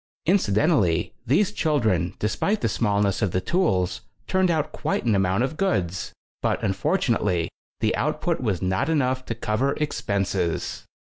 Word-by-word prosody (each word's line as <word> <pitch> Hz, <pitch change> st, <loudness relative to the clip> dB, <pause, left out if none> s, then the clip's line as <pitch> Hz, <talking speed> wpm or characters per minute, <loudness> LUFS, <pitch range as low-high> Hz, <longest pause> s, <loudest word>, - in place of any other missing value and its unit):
Incidentally, 105 Hz, -, +2 dB
these 190 Hz, -, +3 dB
children, 110 Hz, -, +1 dB
despite 200 Hz, -, 0 dB
the -, -, +2 dB
smallness 100 Hz, -3 st, +1 dB
of 105 Hz, -, +2 dB
the 90 Hz, -, 0 dB
tools, 95 Hz, -, 0 dB, 0.2 s
turned 190 Hz, -1 st, +2 dB
out 160 Hz, -3 st, 0 dB
quite -, -, -2 dB
an 115 Hz, -, +3 dB
amount 95 Hz, +3 st, +2 dB
of 145 Hz, +4 st, -2 dB
goods, 95 Hz, -, -1 dB, 0.3 s
but, -, -, 0 dB
unfortunately, 95 Hz, -, +1 dB, 0.3 s
the -, -, +2 dB
output -, -, -1 dB
was 100 Hz, -7 st, -1 dB
not 95 Hz, -, 0 dB
enough 130 Hz, -4 st, +1 dB
to 115 Hz, -, -3 dB
cover 120 Hz, +5 st, 0 dB
expenses. 100 Hz, -, -2 dB
110 Hz, 140 wpm, -24 LUFS, 95-155 Hz, 0.3 s, these